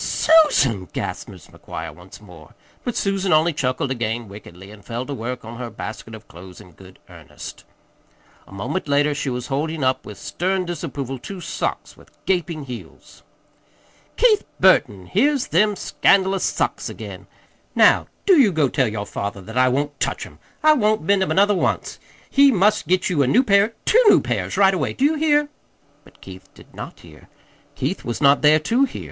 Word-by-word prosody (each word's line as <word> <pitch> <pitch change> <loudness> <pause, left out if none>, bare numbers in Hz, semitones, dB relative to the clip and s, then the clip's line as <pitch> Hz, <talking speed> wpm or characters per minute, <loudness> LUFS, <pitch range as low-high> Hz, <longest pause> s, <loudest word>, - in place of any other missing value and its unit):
"Susan!" 140 - +3
gasped - - -5
Mrs. - - -14
McGuire 80 -1 -8
once 90 +4 -14
more; 90 -7 -16 0.3
but 245 - -3
Susan 195 -1 -1
only 160 +2 +3
chuckled 130 -1 -2
again 120 -2 -3
wickedly, 95 -1 -12
and 105 -1 -15
fell 120 +4 -5
to 145 - -5
work 125 -1 -5
on 115 +1 -9
her 120 -2 -5
basket 110 +1 -8
of 110 - -14
clothes 90 +1 -13
in 95 -4 -15
good 95 +3 -16
earnest. - - -11 0.8
A - - -18
moment 125 - -4
later 145 +1 +2
she 140 -1 -3
was 125 -1 -4
holding 150 +2 -3
up 130 0 0
with 105 - -10
stern 185 +1 -2
disapproval 135 -6 -5
two 195 +8 -8
socks - - -4
with - - -20 0.2
gaping 170 -4 -1
heels. 125 -3 -11 1.0
"Keith 450 -4 +4 0.2
Burton, 135 - +3
here's 270 - +1
them 210 +5 +2
scandalous 195 0 +2
socks - - -2
again! - - -9 0.5
Now, - - +4 0.2
do 375 -6 +5
you 225 -7 +5
go 155 -5 +1
tell 130 0 +1
your 105 -1 -4
father 100 -1 -5
that 110 +5 -11
I 130 0 +4
won't 145 +2 -2
touch - - -2
'em. - - -16 0.2
I 310 0 +7
won't 215 - +1
mend 200 +3 +2
'em 190 - 0
another 200 +2 +3
once. 190 - -2 0.3
He 280 0 +5
must 210 - +2
get 185 +2 +1
you 155 -5 +1
a 135 - +2
new 245 - +4
pair 205 0 +3
two 485 +3 +5
new - - +6
pairs, - - -3
right 195 -1 +5
away. 165 -7 -2
Do 265 - 0
you 305 - +3
hear?" 295 -1 +2 0.5
But - - -22
Keith 95 -1 -12
did - - -18
not - - -9
hear. - - -17 0.5
Keith - - -3
was 120 - -4
not 140 0 +4
there 150 +1 +6
to 230 - +1
hear. 265 - -8
145 Hz, 185 wpm, -21 LUFS, -, 1.0 s, I